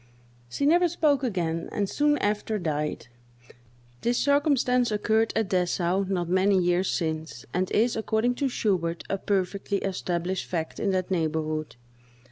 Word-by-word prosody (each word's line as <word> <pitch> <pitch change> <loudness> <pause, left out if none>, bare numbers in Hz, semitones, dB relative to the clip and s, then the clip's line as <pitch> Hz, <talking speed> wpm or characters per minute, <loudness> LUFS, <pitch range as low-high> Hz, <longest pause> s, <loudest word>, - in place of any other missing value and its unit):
She 280 - -2
never 350 +4 +5
spoke 295 -5 +2
again, 170 -8 -2
and 200 -1 -1
soon 295 +6 +2
after 210 0 -1
died. 150 -5 -2 1.0
This 240 +1 +1
circumstance 280 -4 +2
occurred 220 +1 +1
at 220 -3 0
Dessau, 180 0 +1
not 180 -3 -1
many 190 +2 +3
years 180 +1 +2
since, 160 -5 -3
and 185 +1 0
is, 230 +3 +2
according 220 +2 +1
to 275 - +2
Schubert, 175 -8 -1
a 195 - -1
perfectly 200 +1 -1
established 185 -1 -2
fact 165 -3 -3
in 205 - 0
that 185 -1 -1
neighborhood. 155 -3 -1
195 Hz, 140 wpm, -26 LUFS, 175-225 Hz, 1.0 s, never